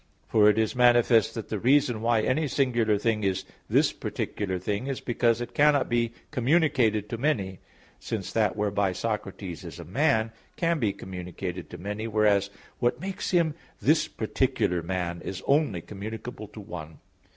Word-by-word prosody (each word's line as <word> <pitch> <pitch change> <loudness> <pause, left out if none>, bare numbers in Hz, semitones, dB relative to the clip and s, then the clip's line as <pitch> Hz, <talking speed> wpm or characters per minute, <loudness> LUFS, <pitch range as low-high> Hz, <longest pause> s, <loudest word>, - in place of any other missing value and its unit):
For 105 -1 +5
it 105 - +2
is 110 +2 +1
manifest 120 -2 +4
that 115 - -5
the 110 - -2
reason 125 -1 +3
why 115 -1 +3
any 145 +7 +1
singular 120 -6 +2
thing 105 0 0
is 95 -2 0 0.2
"this - - +4
particular 95 -3 -3
thing" 100 +7 -3
is 135 -2 -2
because 120 -1 +1
it 120 - -6
cannot 145 -1 +4
be 120 -1 +1 0.2
communicated 125 - +2
to 115 - -4
many: 100 - 0 0.4
since 100 -5 -4
that 105 -3 +2
whereby 100 -2 0
Socrates 95 -4 -4
is - - -8
a - - -8
man, 110 - +1 0.2
can 170 -2 +1
be 110 -6 +1
communicated 90 -1 -6
to 90 - -8
many; 105 +5 -4
whereas, 105 -2 +3 0.3
what 120 +2 +1
makes 190 +3 -4
him 170 -4 +2 0.3
this - - +3
particular 90 -1 0
man, 85 0 -3
is 95 - -6
only 140 - +2
communicable 110 +3 -7
to 110 - -12
one. 80 -6 -8
110 Hz, 160 wpm, -27 LUFS, 100-125 Hz, 0.4 s, For